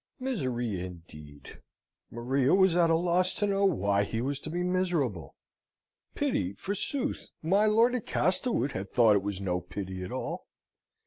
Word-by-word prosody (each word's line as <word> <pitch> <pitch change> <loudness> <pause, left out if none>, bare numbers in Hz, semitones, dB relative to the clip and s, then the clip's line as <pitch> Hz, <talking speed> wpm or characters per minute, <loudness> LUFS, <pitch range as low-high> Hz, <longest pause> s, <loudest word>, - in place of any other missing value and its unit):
Misery, 125 - -2
indeed! 75 -5 -11 0.5
Maria 130 +5 +1
was 190 -3 +4
at 170 -1 +4
a 165 - +4
loss 180 +2 +1
to 205 - 0
know 200 0 +1
why 100 - +2
he 115 +2 -3
was 135 +3 -2
to 155 - -7
be 175 +2 -2
miserable. 175 - -1 0.8
Pity, 90 +2 -1
forsooth! 205 - -3 0.2
My 195 +6 +3
lord 230 +3 +4
at 250 -4 -3
Castlewood 180 - +1
had 95 -3 -6
thought 115 -4 +5
it 100 - +2
was 100 -1 -4
no 90 -2 -1
pity 95 +1 -6
at 90 - -7
all. - - -5
135 Hz, 155 wpm, -29 LUFS, -, 0.8 s, thought